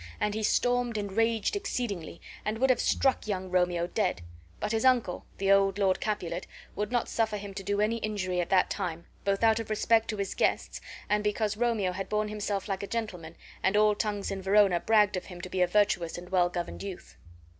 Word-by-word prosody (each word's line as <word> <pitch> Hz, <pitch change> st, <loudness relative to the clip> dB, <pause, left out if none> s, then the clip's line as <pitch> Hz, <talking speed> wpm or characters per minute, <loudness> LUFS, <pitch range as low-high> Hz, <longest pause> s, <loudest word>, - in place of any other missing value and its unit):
And 210 Hz, 0 st, 0 dB
he 220 Hz, -, -2 dB
stormed 245 Hz, +1 st, +1 dB
and 205 Hz, -1 st, -3 dB
raged 225 Hz, -, +1 dB
exceedingly, 235 Hz, -, -4 dB, 0.2 s
and 215 Hz, +1 st, -2 dB
would 260 Hz, +2 st, +4 dB
have 250 Hz, -, +1 dB
struck 265 Hz, -4 st, +1 dB
young 190 Hz, -3 st, -3 dB
Romeo 180 Hz, -1 st, +2 dB
dead. 175 Hz, -, -1 dB, 0.4 s
But 210 Hz, -, -2 dB
his 225 Hz, -1 st, 0 dB
uncle, 245 Hz, -8 st, +2 dB
the 195 Hz, 0 st, +1 dB
old 195 Hz, 0 st, +4 dB
Lord 195 Hz, -2 st, +2 dB
Capulet, 180 Hz, -5 st, -3 dB, 0.3 s
would 210 Hz, +2 st, -2 dB
not 240 Hz, -2 st, +1 dB
suffer 220 Hz, -2 st, 0 dB
him 200 Hz, -1 st, -7 dB
to 195 Hz, -, -5 dB
do 200 Hz, +1 st, -1 dB
any 220 Hz, +2 st, +1 dB
injury 195 Hz, -5 st, -1 dB
at 170 Hz, -, -4 dB
that 190 Hz, -1 st, +3 dB
time, 170 Hz, -4 st, -3 dB, 0.2 s
both 200 Hz, +2 st, +1 dB
out 225 Hz, 0 st, +4 dB
of 225 Hz, -, -5 dB
respect 225 Hz, +1 st, +2 dB
to 215 Hz, -, -3 dB
his 200 Hz, -1 st, -2 dB
guests -, -, 0 dB, 0.3 s
and 210 Hz, 0 st, +1 dB
because 210 Hz, 0 st, 0 dB
Romeo 225 Hz, -5 st, +1 dB
had 190 Hz, +1 st, -5 dB
borne 210 Hz, 0 st, 0 dB
himself 205 Hz, -2 st, -3 dB
like 195 Hz, -2 st, -2 dB
a 200 Hz, -, -5 dB
gentleman 180 Hz, -8 st, -4 dB, 0.3 s
and 190 Hz, +2 st, +2 dB
all 210 Hz, 0 st, +5 dB
tongues 205 Hz, -1 st, -2 dB
in 195 Hz, -1 st, -4 dB
Verona 195 Hz, -2 st, +4 dB
bragged 210 Hz, -1 st, +3 dB
of 180 Hz, -, -5 dB
him 180 Hz, -2 st, -10 dB
to 185 Hz, -, -7 dB
be 185 Hz, -, 0 dB
a 180 Hz, -, +5 dB
virtuous 180 Hz, -4 st, +1 dB
and 175 Hz, 0 st, -9 dB
well 180 Hz, -2 st, +3 dB
governed 175 Hz, -1 st, -5 dB
youth. 195 Hz, -3 st, -8 dB
205 Hz, 215 wpm, -29 LUFS, 185-220 Hz, 0.4 s, all